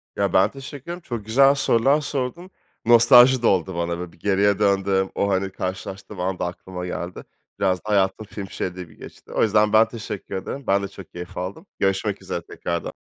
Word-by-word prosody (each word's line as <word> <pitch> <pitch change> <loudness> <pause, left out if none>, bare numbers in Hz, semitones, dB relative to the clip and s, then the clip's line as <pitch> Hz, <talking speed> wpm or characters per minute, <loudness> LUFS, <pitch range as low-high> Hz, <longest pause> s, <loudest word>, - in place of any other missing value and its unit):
Ya 100 -2 0
ben 95 +3 +4
teşekkür 140 0 -9
ederim, 175 +1 -6
çok 120 -9 -6
güzel 135 +5 +5
sorular 135 +3 +3
sordun, 145 +6 -4 0.4
nostalji 120 +2 +7
de 120 - +3
oldu 95 -1 +1
bana 85 0 -2
böyle. 90 -1 -6
Bir - - -22
geriye 100 +1 +2
döndüm, 95 -1 +2
o, 100 - +1
hani, 95 0 0
karşılaştığım 95 +1 -6
an 90 0 -2
da - - -1
aklıma 90 +1 -6
geldi. 90 0 -5 0.4
Biraz 95 -2 +2
da 105 - -10
hayatım 100 +1 +1
film 100 -2 -8
şeridi 90 0 -4
gibi 80 -2 -17
geçti. - - -13
O - - +2
yüzden 105 -1 +3
ben 110 +1 +6
teşekkür 105 -4 -7
ederim, 135 +8 -5
ben 100 +1 +2
de - - -2
çok 95 -4 -13
keyif 90 0 -9
aldım. 95 - -5
Görüşmek 95 +1 0
üzere 95 -2 -4
tekrardan. 85 0 -4
100 Hz, 200 wpm, -23 LUFS, 95-115 Hz, 0.4 s, nostalji